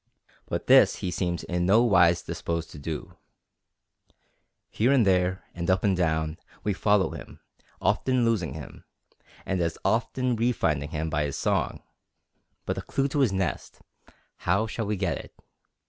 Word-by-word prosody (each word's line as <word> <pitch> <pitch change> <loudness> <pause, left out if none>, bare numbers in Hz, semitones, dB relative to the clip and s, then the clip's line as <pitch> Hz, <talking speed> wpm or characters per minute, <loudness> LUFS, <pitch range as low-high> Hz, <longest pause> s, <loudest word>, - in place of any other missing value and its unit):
But - - -3
this - - +6
he 90 - -4
seems 85 -2 -2
in 90 0 -1
no 110 +5 +5
wise 85 -7 +4
disposed 85 -1 -4
to 75 - -10
do. 75 +2 -6 1.5
Here 120 +5 +2
and 130 -6 +4
there, 90 -1 +2
and 85 0 -4
up 95 0 +2
and 100 -2 +3
down, 80 -2 0 0.2
we 105 - 0
follow 100 0 +2
him, - - -10 0.4
often 130 -2 +1
losing 90 - 0
him, 80 - -10 0.6
and 95 -2 -1
as 85 -1 -1
often 120 +4 +1
refinding 80 -12 0
him 80 0 -3
by 75 0 +1
his 70 - -4
song; - - -1 0.8
but - - -2
the - - -2
clew 135 0 -1
to 145 - -1
his 130 -7 +3
nest, 95 -6 -3 0.6
how 100 +5 +1
shall 110 -1 -4
we 105 - 0
get 90 -7 -1
it? - - -12
95 Hz, 160 wpm, -26 LUFS, 80-110 Hz, 1.5 s, this